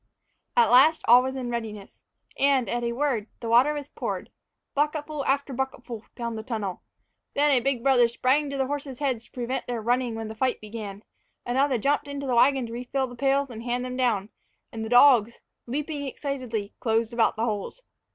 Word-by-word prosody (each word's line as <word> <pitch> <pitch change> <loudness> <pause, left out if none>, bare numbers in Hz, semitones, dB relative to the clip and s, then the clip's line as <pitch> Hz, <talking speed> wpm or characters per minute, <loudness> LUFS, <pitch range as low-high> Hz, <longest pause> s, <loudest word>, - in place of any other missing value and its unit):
At 475 - +5
last 290 +6 +6
all 245 +2 +8
was 260 +1 -3
in 250 -2 -4
readiness, 215 -4 -6 0.4
and, 275 -3 +3
at 240 0 -2
a 235 - 0
word, 240 -4 -1
the 230 - -6
water 245 +6 +5
was 290 -1 -5
poured - - -5 0.4
bucketful 300 0 -1
after 275 0 0
bucketful 245 -3 -5
down 235 -1 -4
the 220 - -4
tunnels. 215 -6 -4 0.6
Then 290 +1 +3
a 265 - +5
big 250 -1 -1
brother 255 -3 +5
sprang 260 +5 +1
to 280 - -4
the 265 - +1
horses' 275 -1 -4
heads 255 -5 -2
to - - -24
prevent 250 +1 -3
their 240 -1 -2
running 240 +1 0
when 225 -1 -5
the 220 - -6
fight 255 +3 0
began, 210 -2 -8 0.4
another 265 +2 +2
jumped 280 +6 0
into 280 0 -5
the 255 - -1
wagon 260 +2 +4
to 230 - -8
refill 250 +3 -2
the 245 -1 -10
pails 275 +1 +1
and 225 -1 -7
hand 245 +1 -2
them 255 0 -5
down, 225 -6 0 0.4
and 225 -1 -5
the 220 - -5
dogs, 245 -2 +6 0.3
leaping 290 +2 -3
excitedly, 250 -7 -4
closed 225 -1 0
about 235 -1 +2
the 225 +1 0
holes. 220 - -4
250 Hz, 195 wpm, -26 LUFS, 230-275 Hz, 0.6 s, all